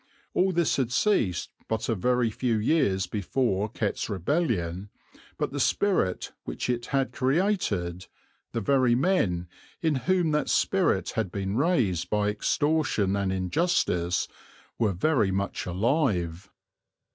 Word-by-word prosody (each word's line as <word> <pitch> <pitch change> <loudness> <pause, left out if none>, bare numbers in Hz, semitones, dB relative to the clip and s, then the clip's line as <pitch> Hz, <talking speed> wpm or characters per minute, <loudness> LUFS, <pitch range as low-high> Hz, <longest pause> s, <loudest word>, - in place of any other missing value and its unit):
All 190 +1 +2
this 170 -3 +1
had 125 -3 0
ceased 120 - +1 0.2
but 110 -1 -2
a - - +1
very 120 +3 +1
few 115 0 0
years 105 - +2
before 105 +2 -1
Kett's 110 -1 -2
Rebellion, 100 - -1 0.5
but - - -2
the - - -4
spirit 185 - +1
which - - -3
it 120 -1 -3
had 135 -1 0
created, 130 - 0 0.4
the 115 - -2
very 130 +1 +3
men 115 - +1 0.3
in 160 -2 +1
whom 180 -4 +3
that 150 0 0
spirit - - +2
had 90 - -2
been 95 +1 -3
raised 110 - +1
by 105 -1 +1
extortion 110 -2 +1
and 100 -1 0
injustice, 95 - 0 0.5
were 110 -4 +2
very 110 - +2
much 100 0 -2
alive. 95 - 0
110 Hz, 130 wpm, -27 LUFS, 95-145 Hz, 0.5 s, very